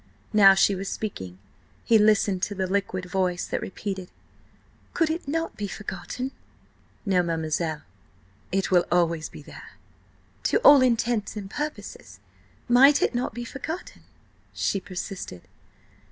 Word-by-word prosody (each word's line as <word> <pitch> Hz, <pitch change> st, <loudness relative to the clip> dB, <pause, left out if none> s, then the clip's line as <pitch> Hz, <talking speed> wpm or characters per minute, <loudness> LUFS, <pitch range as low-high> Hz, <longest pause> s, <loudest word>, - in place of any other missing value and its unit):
Now 195 Hz, -2 st, +8 dB
she 195 Hz, +1 st, +4 dB
was 195 Hz, +1 st, -4 dB
speaking: 95 Hz, -, -5 dB, 0.5 s
he 225 Hz, -1 st, +5 dB
listened 205 Hz, -3 st, +3 dB
to 205 Hz, -, -2 dB
the 190 Hz, -1 st, -1 dB
liquid 185 Hz, -1 st, -2 dB
voice 180 Hz, -1 st, -1 dB
that -, -, -3 dB
repeated: 190 Hz, -2 st, -5 dB, 0.9 s
"Could 325 Hz, -2 st, +2 dB
it 325 Hz, -2 st, -4 dB
not 325 Hz, +3 st, -2 dB
be 205 Hz, -, -4 dB
forgotten?" 250 Hz, +6 st, -6 dB, 0.7 s
"No, 190 Hz, -3 st, +3 dB
mademoiselle. 160 Hz, -2 st, -2 dB, 0.7 s
It 195 Hz, +1 st, 0 dB
will 175 Hz, -1 st, +4 dB
always 170 Hz, -3 st, +1 dB
be 150 Hz, -, -12 dB
there." -, -, -12 dB, 0.7 s
"To -, -, +3 dB
all 285 Hz, -2 st, +8 dB
intents 235 Hz, -3 st, +1 dB
and 195 Hz, -2 st, -7 dB
purposes, 300 Hz, +3 st, -6 dB, 0.5 s
might 265 Hz, +4 st, +6 dB
it -, -, +1 dB
not 245 Hz, -2 st, -2 dB
be 240 Hz, 0 st, -5 dB
forgotten?" 315 Hz, +8 st, -7 dB, 0.5 s
she 200 Hz, -, 0 dB
persisted. 185 Hz, -, -7 dB
195 Hz, 135 wpm, -25 LUFS, 180-240 Hz, 0.9 s, Now